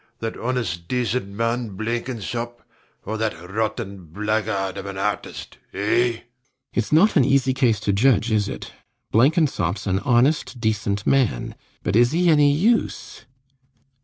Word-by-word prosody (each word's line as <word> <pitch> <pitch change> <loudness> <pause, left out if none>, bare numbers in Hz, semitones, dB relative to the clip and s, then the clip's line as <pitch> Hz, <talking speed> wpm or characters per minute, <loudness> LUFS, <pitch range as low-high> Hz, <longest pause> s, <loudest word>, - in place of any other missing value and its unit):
that 115 0 -4
honest 115 -9 -3
decent 125 -3 -1
man 115 0 -2
Blenkinsop, 120 +1 -4 0.4
or 110 +2 -4
that 110 -7 -1
rotten 105 -3 -3
blackguard 105 +1 -1
of 100 - -7
an 100 -1 -6
artist, 105 +1 -4 0.2
eh? - - -6
RIDGEON. 115 +3 +1 0.5
Its 115 - -1
not 170 +8 +5
an 145 - +5
easy 135 0 +2
case 125 -5 +2
to 105 -2 0
judge, 115 +1 +3
is 105 -2 +1
it? - - -7 0.4
Blenkinsop's 130 - +2
an 95 -1 +1
honest 130 +2 +2
decent 105 -3 -1
man; 130 - +1 0.3
but 90 - 0
is 120 +4 +4
he 175 0 +3
any 145 -2 +5
use? 215 +11 0
115 Hz, 140 wpm, -22 LUFS, 100-130 Hz, 0.5 s, not